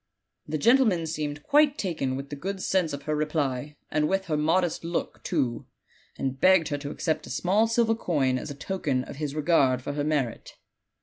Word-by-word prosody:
The 155 +1 -1
gentle 250 - +5
man 175 -5 0
seemed 150 -2 -4
quite 295 0 +4
taken 155 -9 -2
with 140 +1 -7
the - - -3
good 190 +7 -4
sense 185 -4 +1
of 140 0 -6
her 155 +1 -1
reply, 150 -2 -1 0.2
and 150 0 +1
with 195 0 0
her 155 - -1
modest 165 +3 +1
look, 170 +1 -3
too, 130 - -1 0.5
and 135 0 -3
begged 185 -4 +5
her 145 - -1
to 140 0 -5
accept 155 0 -2
a - - -9
small 205 +5 +2
silver 230 0 +2
coin 140 - 0
as 155 - -7
a 145 - -6
token 140 -6 -2
of 135 - -9
his 150 -1 -3
regard 140 -5 +2
for 145 - -3
her 145 0 -1
merit." 145 -6 -2
155 Hz, 200 wpm, -27 LUFS, 140-185 Hz, 0.5 s, gentle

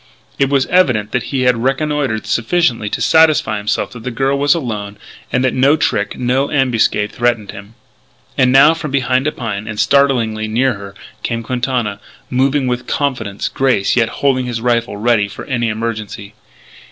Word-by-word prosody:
It 140 -1 +2
was 140 -2 +2
evident 130 - +2
that 125 - -1
he 135 -2 -1
had 125 -2 +2
reconnoitred 135 -4 -1
sufficiently 115 -4 0
to - - -3
satisfy 155 -9 +3
himself 105 0 -2
that 120 - -10
the 125 - -4
girl 135 +3 0
was 140 +2 +3
alone 105 -9 -5 0.3
and 130 +1 +1
that 130 - +1
no 135 +4 +3
trick, 105 -8 -1
no 130 +3 0
ambuscade, 120 -7 +1
threatened 120 -4 -1
him. 100 +3 -12 0.6
And 125 0 +3
now, 140 +4 +6
from 160 -2 -5
behind 130 0 0
a - - +1
pine, 110 -5 -5
and 105 -1 -5
startlingly 115 -3 +2
near 125 +4 +1
her, 100 -1 -10 0.3
came 115 +1 -3
Quintana, 120 -4 -2 0.3
moving 135 +2 +1
with 125 0 -2
confident 120 -8 -2
grace 130 -7 +1
yet 115 -2 +2
holding 130 -3 0
his 120 -2 -3
rifle 115 -2 0
ready 110 -1 +2
for 100 - -9
any 120 -4 -1
emergency. 110 -2 -5
125 Hz, 170 wpm, -16 LUFS, 110-135 Hz, 0.6 s, now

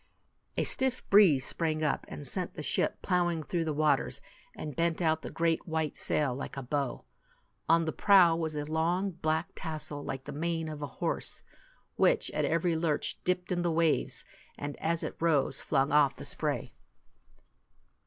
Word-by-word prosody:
A - - +2
stiff 265 -1 -1
breeze 175 -10 +6
sprang 155 -2 -1
up, 150 -3 0
and 145 - -7
sent 180 -3 -2
the 150 - -5
ship - - +1
plowing 175 -3 +1
through 165 +2 -1
the 155 - -1
waters, 150 -2 +1 0.4
and 150 -3 -6
bent 165 -1 +1
out 160 -2 +1
the - - -6
great 165 0 0
white 160 -2 -1
sail 145 -4 0
like 135 +2 -6
a 135 - -4
bow. 140 0 -2 0.6
On 165 0 +5
the 160 - -1
prow 185 -4 +6
was 160 -2 -2
a 145 0 -2
long 170 +5 0
black 160 +1 -1
tassel 155 -3 -5
like 135 -1 -5
the 145 - -7
mane 165 +2 -2
of 150 -1 -7
a 145 - -3
horse, - - -2 0.5
which - - +3
at - - 0
every 165 +1 +1
lurch 160 -2 -1
dipped 180 0 -1
in 175 -1 +1
the 175 - +1
waves, 165 -1 +1 0.3
and 145 0 -5
as 165 0 -1
it - - -4
rose 150 -5 +1
flung 135 -2 +1
off 145 -2 +4
the - - -9
spray. - - -3
160 Hz, 175 wpm, -30 LUFS, 150-170 Hz, 0.6 s, breeze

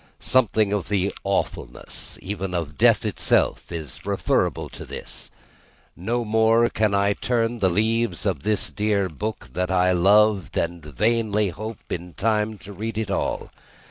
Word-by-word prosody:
Something 110 -5 +2
of 100 -5 -2
the 100 -1 +1
awfulness, - - -3
even 95 -1 -3
of 80 -4 -3
Death - - +4
itself, - - +1
is 80 -6 -6
referable - - 0
to - - -9
this. - - -8 0.7
No 115 +6 -2
more 110 +2 +4
can 105 -2 +1
I 100 +1 +3
turn 120 +1 -1
the 95 - +3
leaves 110 +6 0
of 90 -9 0
this 105 +4 0
dear 105 -2 0
book 105 +7 -5
that 90 0 -1
I 90 0 +3
loved, 100 +2 +4
and 85 -1 -1
vainly 105 - +1
hope 110 +5 -8
in 90 0 -5
time 110 0 0
to 100 - -8
read 110 +2 -4
it 110 -3 -2
all. - - -2
105 Hz, 150 wpm, -24 LUFS, 90-110 Hz, 0.7 s, Death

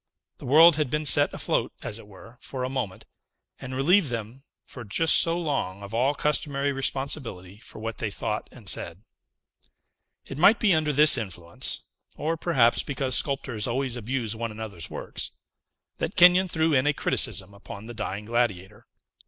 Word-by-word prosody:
The - - -9
world 160 +4 +7
had 150 -4 0
been 150 +3 -2
set 145 0 +6
afloat, - - -2
as 105 - -4
it 105 - -14
were, 110 +4 -15
for 130 -2 -6
a 130 - -2
moment, 125 -8 -5 0.5
and 130 0 -7
relieved 165 +5 +3
them, 115 +2 -6 0.2
for 125 - -9
just 155 +10 +3
so 165 +1 +1
long, 120 - -3
of 100 +2 -10
all 130 +5 +1
customary 145 -1 0
responsibility 135 -8 -4
for 115 - -13
what 115 +1 -6
they 115 - -2
thought 105 +2 -4
and 115 -6 -15
said. 85 +1 -2 1.2
It - - -8
might 205 +7 +6
be 210 -5 +3
under 155 -2 +1
this 150 -2 +7
influence 85 -5 -3 0.4
or, 160 +2 -1
perhaps, 135 -8 +2
because 130 -2 -2
sculptors 135 -6 -1
always 130 +1 -1
abuse 120 -1 -3
one 115 +1 -4
another's 105 -6 -6
works - - -4 0.7
that - - -3
Kenyon 180 +2 +6
threw 160 -2 0
in 130 +1 +2
a 150 - +3
criticism 100 -8 +1
upon 100 +1 -11
the 120 - -8
Dying 105 -2 -5
Gladiator. 105 -4 -2
125 Hz, 170 wpm, -25 LUFS, 105-145 Hz, 1.2 s, world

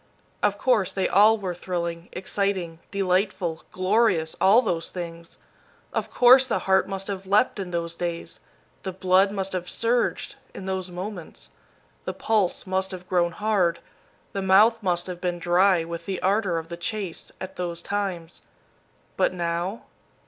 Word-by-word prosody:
Of 205 -1 +2
course, 225 -7 +2
they 190 - 0
all 215 +2 +6
were 190 -4 -3
thrilling, 170 -1 -4
exciting, 185 -3 -2
delightful, 185 -3 0
glorious, 185 -4 +2
all 215 +6 +6
those 165 -6 -1
things. 170 -2 -7 0.6
Of - - -2
course, 255 +2 +6
the 240 - +1
heart 190 0 +3
must 195 0 -4
have 195 -1 -5
leaped 205 +2 +3
in 190 -2 -4
those 170 -1 -2
days. 170 -1 -4 0.4
The 190 - -5
blood 190 +1 +3
must 195 -1 -3
have 180 -1 -3
surged, 235 +1 0 0.2
in 190 - -7
those 190 -1 -3
moments. 180 0 -7 0.5
The - - -3
pulse 215 -5 0
must 190 0 -1
have 180 -1 -8
grown 175 -2 +1
hard, 200 -5 +1 0.6
the 195 - -2
mouth 210 +5 +5
must 175 -3 0
have 180 -1 -7
been 175 -1 -1
dry 175 +1 +3
with 170 0 -7
the 190 -2 -2
ardor 195 -2 +2
of 165 0 -5
the 170 - -6
chase, 190 0 -4
at 190 0 -7
those 175 -2 -3
times. 190 -5 -3 0.8
But - - +2
now? 175 +4 -2
185 Hz, 155 wpm, -25 LUFS, 175-200 Hz, 0.8 s, all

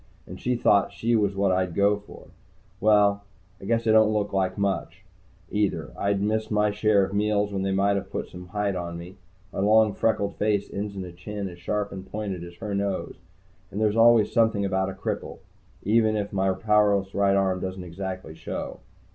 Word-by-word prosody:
And - - -10
she 125 0 0
thought 105 -4 +3
she 115 +1 0
was 100 -3 +1
what 100 -1 +2
I'd 90 -2 0
go 100 +1 +4
for. 105 - -14 0.5
Well, 100 -1 +4 0.4
I - - -9
guess 115 +2 0
I 110 - +4
don't 110 -1 +5
look 105 -2 -1
like 95 -1 0
so 100 - -4
much, 95 -6 -2 0.5
either. 105 -1 -1
I'd 100 0 0
missed 110 +1 0
my 105 -1 +2
share 105 -1 +3
of 95 - -8
meals 105 0 +1
when 95 - -1
they 95 0 0
might 100 +1 +2
have 100 - -5
put - - -4
some 90 0 -11
height 100 +1 -1
on 85 -1 -4
me. 90 +3 -10 0.4
My - - -4
long, 105 +1 +4
freckled 100 -3 0
face 105 -1 0
ends 100 0 -4
in 95 -1 -5
a 90 - -8
chin 100 +3 -6
as 85 -1 -12
sharp 100 +3 -2
and 95 -1 -9
pointed 100 -5 -4
as 85 0 -10
her 105 +1 -5
nose. 100 -3 -2 0.6
And 100 - -5
there's 105 -1 +2
always 115 -1 +5
something 110 -3 +2
about 95 0 0
a - - -5
cripple, 95 - -4 0.5
even 110 +1 +3
if 105 -1 -3
my 95 0 +2
powerless 100 -1 +2
right 100 -1 +3
arm 95 -1 +1
doesn't 95 0 -5
exactly 95 -1 -6
show. 80 +1 -6
100 Hz, 205 wpm, -25 LUFS, 95-105 Hz, 0.6 s, don't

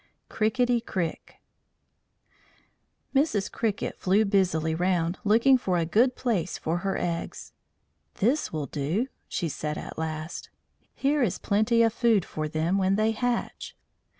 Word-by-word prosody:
CRIKITTY 240 +2 +1
CRIK 180 -7 -4 1.8
Mrs. 270 -8 +1
Cricket 220 -3 -2
flew 200 +4 +3
busily 180 -6 +1
round, 175 0 0
looking 235 +5 +5
for 185 -6 0
a 170 - +1
good 240 +9 +3
place 200 -9 -1
for 165 +2 -1
her 195 +1 -1
eggs. 170 -1 -4 0.6
"This 255 +9 +1
will 155 -3 -3
do," 155 - -2 0.2
she 170 - -2
said 150 0 -4
at - - -7
last. 160 +1 -5 0.5
"Here 285 +1 +1
is 225 -8 +1
plenty 220 +3 +2
of 225 -1 +2
food 230 -6 +2
for 155 0 -4
them 160 +5 0
when 190 0 +2
they 215 +2 +2
hatch." 240 +2 -3
195 Hz, 135 wpm, -27 LUFS, 165-230 Hz, 1.8 s, looking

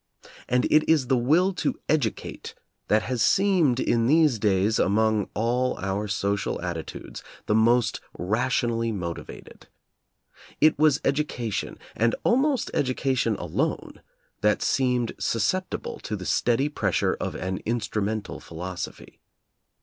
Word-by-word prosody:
And 125 +1 +2
it 155 0 +5
is 145 -6 +2
the 130 - +4
will 160 +11 +3
to 180 - -2
educate 140 -9 -2 0.3
that 105 +1 +3
has 125 -1 -2
seemed, 175 - +3
in 115 -2 +1
these 150 -5 +4
days, 100 +1 +2
among 110 +1 +2
all 125 +4 0
our 100 +2 -2
social 100 0 -1
atti 85 -2 -4
tudes - - -9 0.2
the - - +1
most 115 +1 +3 0.2
rationally 115 +3 0
motivated. 85 -5 -7 0.9
It 155 -2 +4
was 150 -2 +5
edu 145 +2 +1
cation, 115 -7 -4 0.2
and 115 +1 +2
almost 265 +1 +2
education 130 -3 0
alone, 90 -4 -3 0.4
that 105 0 +2
seemed 125 -3 +1
susceptible 150 - -1
to - - -4
the - - -7
steady 125 +4 +1
pressure 150 - 0
of - - -3
an 95 0 -3
"instru 110 -2 -2
mental" 110 +1 -3
philosophy. 90 +2 -7
115 Hz, 130 wpm, -25 LUFS, 105-135 Hz, 0.9 s, it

